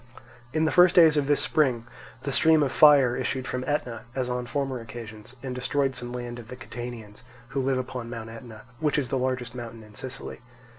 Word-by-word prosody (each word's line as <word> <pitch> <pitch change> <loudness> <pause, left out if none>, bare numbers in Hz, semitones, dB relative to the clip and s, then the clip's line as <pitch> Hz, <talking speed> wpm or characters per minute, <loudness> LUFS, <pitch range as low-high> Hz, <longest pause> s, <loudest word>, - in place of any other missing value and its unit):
In 155 +3 +1
the 160 - +2
first 180 0 +6
days 160 -3 +7
of 145 -2 +1
this 145 -1 +3
spring, 135 -6 +1 0.4
the 140 - -2
stream 155 +3 +5
of 135 - 0
fire 140 -5 +6
issued 130 0 -2
from 125 0 -3
Etna, 125 -6 -2
as 125 -2 -1
on 125 0 -3
former 135 -1 -2
occasions, 115 0 -10
and 130 -2 -4
destroyed 135 +2 0
some 120 -1 -5
land 120 -1 -5
of 115 - -11
the 125 - -8
Catanians, 115 -3 -8 0.3
who 135 0 -1
live 130 0 +1
upon 125 -2 -5
Mount 115 -1 -6
Etna, 115 -1 -11 0.2
which 150 -2 +1
is 135 -4 0
the 135 - 0
largest 125 -2 -2
mountain 115 -2 -8
in 105 0 -16
Sicily. 130 -1 -7
125 Hz, 205 wpm, -26 LUFS, 120-140 Hz, 0.4 s, days